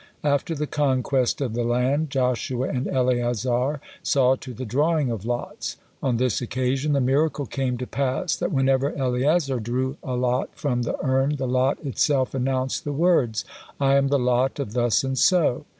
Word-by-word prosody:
After 145 +2 0
the 150 0 -2
conquest 135 -3 0
of 125 -5 -1
the 120 +1 -1
land 125 +6 +1
Joshua 130 -1 -1
and 125 0 -2
Eleazar 125 +2 0 0.2
saw 130 -1 +3
to 130 - -9
the 130 +2 -6
drawing 145 +3 +1
of 110 -3 -5
lots. 120 0 -4 0.2
On 125 -3 +1
this 125 -2 0
occasion 130 +4 -1
the 140 - +2
miracle 140 +3 +1
came 130 -1 -2
to 125 - -4
pass 135 +7 -1
that - - -2
whenever 135 +1 +2
Eleazar 135 +1 +1
drew 130 +5 -2
a 130 - -3
lot 125 +1 0
from 125 -4 -1
the 120 - -2
urn, 135 +2 +2
the 135 -2 -3
lot 130 +2 +2
itself 135 0 +1
announced 130 0 -1
the 145 - -3
words, 140 -8 +2 0.3
"I 135 -1 +3
am 140 0 +3
the 140 +1 +2
lot 125 +1 +1
of 135 -7 -4
Thus 120 -2 +2
and 135 0 -1
So." 170 -9 +3
130 Hz, 175 wpm, -24 LUFS, 125-140 Hz, 0.3 s, saw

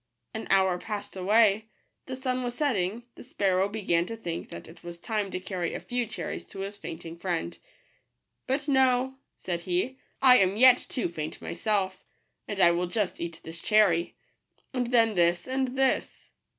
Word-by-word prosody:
An 220 - -5
hour 190 -2 +3
passed 205 0 -6
away; 210 +2 +3 0.4
the 260 - -4
sun 255 -1 -2
was 245 0 -3
setting: 230 -6 0
the - - -13
sparrow 195 - +1
began 185 -5 0
to 230 - -5
think 170 -6 -5
that 85 - -9
it 165 +1 -15
was 170 0 -8
time 210 0 -2
to 185 - -4
carry 185 -2 -3
a - - -3
few 245 -1 -2
cherries - - -5
to 195 - -8
his 200 +1 -5
faint 170 -4 -8
ing 165 +1 -8
friend. 170 - -3 0.4
" 60 0 -53
But 275 +3 -1
no," 265 -1 +2 0.2
said 175 -2 -3
he, 185 +10 -2
" - - -42
I 255 -1 +9
am 190 +1 +2
yet 255 +1 +7
too 245 - -1
faint 155 -2 -6
myself. 190 -1 -2 0.5
I 195 -4 +4
will 175 +1 0
just 200 +1 -2
eat 170 -1 -5
this 165 +1 -9
cherry, 195 -6 +3 0.3
— - - -42
and 250 -2 -1
then 230 -2 +4
this, 175 -1 +2
and 260 0 -1
this." 265 -1 0
200 Hz, 185 wpm, -28 LUFS, 175-245 Hz, 0.5 s, I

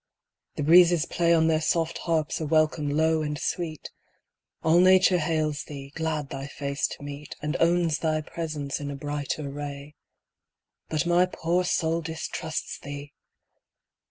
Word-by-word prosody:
The - - -2
breezes 170 +1 +6
play 170 -1 +1
On 165 -1 +4
their 160 -1 +2
soft 165 +1 0
harps 160 -2 -1
a - - -1
welcome 155 -1 +2
low 160 +2 +2
and 150 -1 -2
sweet; 160 -2 -4 0.7
All 160 +2 +5
nature 185 0 +5
hails 155 -2 -1
thee, 140 -2 -9
glad 155 -3 -2
thy 135 +1 -5
face 140 +1 -2
to - - -9
meet, 145 +1 -8
And 150 0 -3
owns 170 -2 +2
thy 155 -1 0
presence 155 -3 -4
in 145 -1 -5
a 140 - -4
brighter 145 +1 -3
ray. 145 0 -7 1.0
But 155 +1 0
my 175 +1 +4
poor 175 0 0
soul 165 -1 0
distrusts 160 0 -4
thee 145 0 -8
155 Hz, 150 wpm, -26 LUFS, 145-165 Hz, 1.0 s, breezes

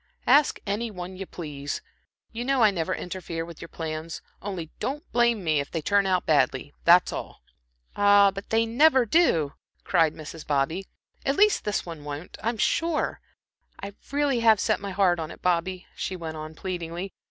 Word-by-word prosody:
"Ask 295 -1 +4
any 215 +3 -2
one 185 -2 -7
you 190 0 -7
please. 145 -4 -6 0.5
You 235 +1 -4
know 265 -1 +2
I 215 - +6
never 175 -1 -2
interfere 170 -2 -5
with 170 -2 -11
your 170 - -7
plans. 160 0 -5 0.2
Only 180 -5 -5
don't 290 +4 -3
blame 235 -4 +2
me 155 -3 +2
if 140 - -3
they 165 -3 -4
turn 200 +2 +3
out 185 -1 +1
badly 145 -2 +1
that's 175 +1 +6
all." - - -7 0.5
"Ah, 205 -1 +6
but 195 +1 -8
they 225 +1 +3
never 260 +2 +4
do," 190 - +3 0.3
cried 165 -4 +2
Mrs. 155 +1 -9
Bobby, 150 +7 0 0.4
"at 275 - +1
least 420 +3 +4
this 210 -1 -1
one 165 -4 -8
won't, 145 +3 -7
I'm 230 +1 -1
sure. 325 +7 0 0.6
I 200 0 -7 0.2
really 280 -3 +1
have 225 -3 +5
set - - +1
my 200 0 -5
heart 185 -2 +2
on 160 -1 -4
it, - - -12
Bobby," 180 +1 0
she 190 - -3
went 165 -3 -6
on, 155 0 -7
pleadingly. 175 +1 -5
185 Hz, 180 wpm, -26 LUFS, 160-220 Hz, 0.6 s, I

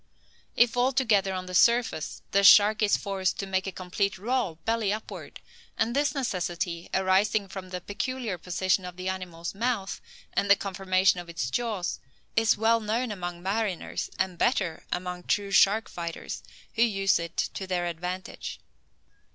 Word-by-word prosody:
If 240 0 +4
altogether 245 -6 +2
on 185 -1 -4
the 185 - -8
surface, 235 -4 +2
the 200 0 +3
shark 210 +2 +7
is 210 -1 +4
forced 190 -2 -1
to 195 - -3
make 190 0 -1
a - - -2
complete 190 +2 -2
roll, 225 -3 -1
belly 225 -3 +1
upward; 215 +1 -6 0.4
and 230 +2 0
this 290 +1 +1
necessity, 175 -8 -2
arising 195 +2 +2
from 190 -1 -8
the 180 -1 -5
peculiar 215 0 -3
position 185 +2 0
of 180 -1 -7
the 185 +1 -3
animal's 175 -3 -5
mouth, 215 -2 -2 0.3
and 200 - 0
the 200 - +9
conformation 190 -1 +1
of 175 -1 -9
its 130 -7 -3
jaws, 215 - -2 0.4
is 225 -1 +4
well 225 +2 +3
known 225 +2 -1
among 175 -3 -5
mariners, 195 -2 -2
and 185 -2 -1
better 190 -10 0
among 180 0 -3
true 200 +2 -1
shark 200 +4 +5
fighters, 170 -1 -6 0.3
who 225 - -1
use 195 -5 +3
it 170 0 -6
to 190 - -2
their 180 -1 -1
advantage. 180 +2 -5
195 Hz, 160 wpm, -27 LUFS, 180-220 Hz, 0.4 s, the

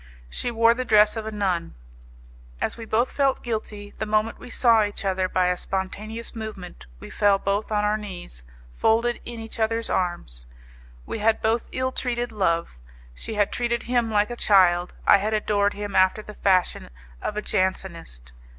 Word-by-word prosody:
She 245 - -2
wore 230 0 +4
the 255 +2 -3
dress 215 -2 +5
of 220 -1 -4
a - - -3
nun. 190 -5 -2 0.8
As - - -1
we 230 - -8
both 230 +3 +1
felt 275 -2 +1
guilty, 215 -3 -5
the 215 - -2
moment 215 +1 0
we 250 - -11
saw 230 -3 +4
each 205 0 -4
other, 190 -1 0
by 185 0 +2
a 180 - +1
spontaneous 210 +6 -5
movement, 195 - -8
we - - -10
fell 205 -1 +3
both 200 +3 -2
on 210 -1 +1
our 210 +1 +1
knees, 175 - -8 0.3
folded 230 - +1
in 235 -1 -7
each 225 +1 -6
other's 225 +1 +1
arms. - - -2 0.6
We - - -5
had 220 +1 +2
both 225 +1 0
ill 260 0 -1
treated 245 -2 -2
Love; 170 - -1 0.3
she 220 - -6
had 205 -1 +1
treated 235 -1 -1
him 240 -2 0
like 210 +1 +1
a - - -4
child, 180 -5 +3
I - - +7
had 215 +2 -1
adored 205 -1 +1
him 205 -1 -5
after 190 +3 +3
the 210 - -10
fashion 185 - +1 0.3
of 210 - -4
a - - 0
Jansenist. 170 - -3
210 Hz, 180 wpm, -24 LUFS, 190-225 Hz, 0.8 s, I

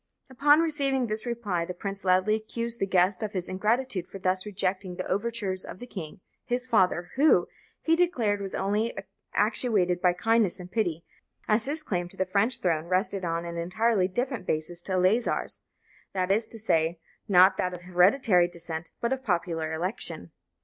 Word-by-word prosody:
Upon 290 +4 +5
receiving 280 -5 +1
this 215 +1 -3
reply 210 -8 -1
the 180 +1 -6
prince 195 +2 -5
loudly 185 +3 +3
accused 230 +2 -2
his 195 - -1
guest 185 +1 +3
of 215 -2 -4
ingratitude 190 +2 -1
for - - -9
thus 185 +1 -1
rejecting 190 -2 -2
the 185 - -4
overtures 200 -2 -1
of - - -9
the 245 - -8
king, 185 -7 -8 0.2
his 250 0 -2
father, 180 -6 +2
who, 300 +3 +5 0.4
he 325 - +3
declared, 245 - +1
was 195 -1 -5
only 210 +4 -1 0.4
actuated 205 -5 +1
by 180 -2 +4
kindness 220 0 +1
and 180 0 -10
pity, 170 -7 -1 0.4
as 215 +1 +2
his 305 +3 0
claim 175 -8 -2
to - - -11
the 190 - +1
French 200 +7 0
throne 165 -3 0
rested 190 +1 0
on 170 0 -2
an 170 0 -5
entirely 185 +3 +1
different 245 0 -3
basis 160 +3 -2
to 190 - -5
Eleazar's; 185 +6 +1 0.5
that 185 -1 0
is 220 +3 +2
to 225 - -8
say, 165 -6 +1 0.3
not 185 -1 +6
that 180 0 -1
of 175 - -11
hereditary 180 +1 +4
descent, 170 -1 -7
but 235 +2 +1
of 265 0 -5
popular 170 -5 -1
election. 175 +6 -3
195 Hz, 175 wpm, -27 LUFS, 180-230 Hz, 0.5 s, not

